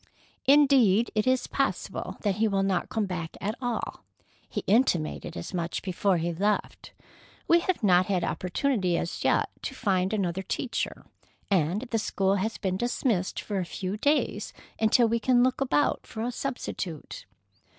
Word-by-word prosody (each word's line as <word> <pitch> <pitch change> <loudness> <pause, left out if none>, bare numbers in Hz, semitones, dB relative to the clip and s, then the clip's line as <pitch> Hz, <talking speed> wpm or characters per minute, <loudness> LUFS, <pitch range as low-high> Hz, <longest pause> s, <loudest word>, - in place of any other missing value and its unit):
Indeed, 265 -7 +5
it 215 +2 0
is 255 0 +2
possible 275 -1 -2
that 205 -2 0
he 220 +1 +3
will 195 -2 +1
not 190 -3 0
come 220 -2 0
back 175 -4 -5
at 210 +2 -2
all. 245 -2 -3 0.5
He - - -3
intimated 175 -7 +1
as 175 - -6
much 170 -1 -2
before 190 0 +1
he 170 +1 -1
left. 205 +5 -1 0.6
We 340 - +6
have 350 -5 -1
not 180 -2 +5
had 185 -3 0
opportunity 185 -1 0
as 170 - -3
yet - - +2
to 265 - -5
find 190 -6 +1
another 190 -4 -1
teacher, 235 +6 -3 0.5
and 180 +2 +2
the 235 -3 -2
school 195 -2 +1
has 220 +3 -2
been 185 -1 -1
dismissed 235 -4 0
for 205 -2 -3
a - - 0
few 185 +3 -4
days 290 +8 0 0.3
until 225 +2 +4
we 230 +1 +1
can 245 0 +4
look 255 +1 +1
about 275 +2 +1
for 220 - -5
a 245 - -1
substitute." 240 - -5
205 Hz, 160 wpm, -27 LUFS, 185-245 Hz, 0.6 s, We